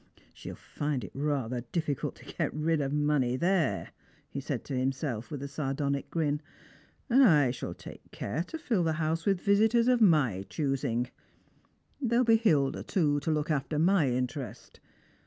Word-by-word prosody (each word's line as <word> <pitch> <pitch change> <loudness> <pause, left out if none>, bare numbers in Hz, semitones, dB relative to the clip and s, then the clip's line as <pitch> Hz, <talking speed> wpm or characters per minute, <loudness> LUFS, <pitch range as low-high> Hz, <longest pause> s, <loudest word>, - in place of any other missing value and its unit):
" - - -30
She'll - - -8
find 145 -4 -3
it 95 - -8
rather 135 -4 -1
difficult 155 -5 -2
to - - -16
get - - -1
rid 155 0 +1
of 135 -1 -1
money 145 -4 +1
there,'' 170 0 0 0.4
he 140 - -4
eaid 135 -3 -3
to 140 - -5
himself, 130 -2 -2
with 145 -3 -5
a - - -3
sardonic 140 0 -2
grin, 150 -3 0 0.4
" - - -33
and 260 +3 +6
I 150 - +5
shall 125 - -6
take - - -12
care 135 +12 -3
to 320 - -6
fill 235 - 0
the 160 -1 +1
house 160 +2 -1
with 195 -2 +3
visitors 220 +5 +3
of 250 -2 +3
ray 150 - +4
own 95 - -7
choosing. 130 -5 -1 0.9
There'll 245 -1 +2
be 225 -1 +6
Hilda, 150 -12 +2
too, 150 -6 +1
to 145 - -4
look 155 0 0
after 150 +1 -1
my 170 -2 +3
interest. 125 -1 -4
150 Hz, 175 wpm, -29 LUFS, 135-170 Hz, 0.9 s, and